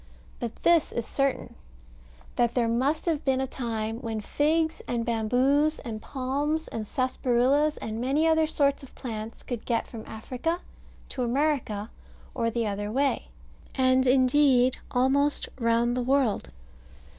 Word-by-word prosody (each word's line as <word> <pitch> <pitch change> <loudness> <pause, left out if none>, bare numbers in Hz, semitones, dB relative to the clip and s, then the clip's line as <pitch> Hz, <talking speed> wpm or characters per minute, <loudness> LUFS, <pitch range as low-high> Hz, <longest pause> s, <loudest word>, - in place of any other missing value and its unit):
But 235 -2 -4
this 335 -2 +4
is 235 - -3
certain, 275 +1 -1 0.8
that 240 -1 +1
there 240 -2 +2
must 260 +7 0
have 320 -4 0
been 265 -1 +1
a 265 - 0
time 225 -3 -3
when 225 -3 -4
figs, 315 +8 0
and 235 -1 -1
bamboos, 255 +7 +2
and 220 -4 -6
palms, 285 +5 -2
and 220 -1 -5
sarsaparillas, 260 +4 +1
and 220 +1 -4
many 275 +5 +1
other 320 -1 +3
sorts 280 -2 +1
of 270 - -14
plants 225 -2 -6
could 240 -3 -5
get 230 -2 0
from 225 -2 -8
Africa 255 +10 -3 0.5
to 260 - -4
America, 245 -5 0 0.4
or 230 -4 0
the 230 0 -1
other 205 0 -3
way, 275 +3 0 0.5
and 260 0 +3
indeed 255 0 +4 0.2
almost 275 +3 +2
round 235 +1 +2
the 250 - 0
world. 260 -3 +1
255 Hz, 145 wpm, -27 LUFS, 230-285 Hz, 0.8 s, this